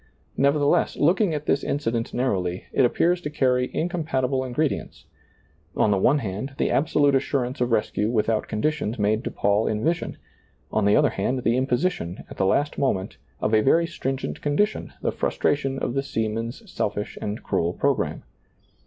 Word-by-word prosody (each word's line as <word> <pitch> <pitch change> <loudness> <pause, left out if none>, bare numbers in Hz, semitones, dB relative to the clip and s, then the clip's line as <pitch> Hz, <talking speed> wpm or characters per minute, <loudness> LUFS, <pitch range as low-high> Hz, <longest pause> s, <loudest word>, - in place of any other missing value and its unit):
Nevertheless, 140 +1 +2
looking 175 +2 +3
at 150 0 -4
this 140 - +1
incident 115 -5 -1
narrowly, 95 -8 -1
it 130 - +4
appears 175 +8 +2
to 150 - -4
carry 125 -3 +1
incompatible 150 -7 -1
ingre 130 +4 +1
dients, - - -6 0.4
— 75 +4 -36
on 105 - +3
the 100 - +2
one 135 +9 +4
hand, 115 +3 -4
the - - +1
absolute 145 0 +3
assurance 130 -1 0
of 125 -1 +1
rescue 105 -1 +1
without 110 -1 0
conditions 120 0 -1
made 105 +2 +1
to - - -2
Paul 100 +2 +1
in 105 0 -1
vision; 165 +1 -1 0.5
on 110 - +1
the 100 - +5
other 150 -2 +4
hand, 125 -1 -1
the 115 - +2
imposition, 130 - -1
at - - -9
the 95 - +2
last 145 +9 +1
moment, 95 -9 -1 0.2
of 110 - 0
a 110 - +5
very 165 +8 +4
stringent 135 -5 -4
condition, 180 +9 0
the - - +1
frustration 135 -2 0
of 120 - -2
the 135 - +1
seamen's 115 - -3
selfish 105 - -3
and 105 +2 -4
cruel 85 +1 0
pro - - +2
gramme. - - -3
130 Hz, 175 wpm, -24 LUFS, 110-145 Hz, 0.5 s, the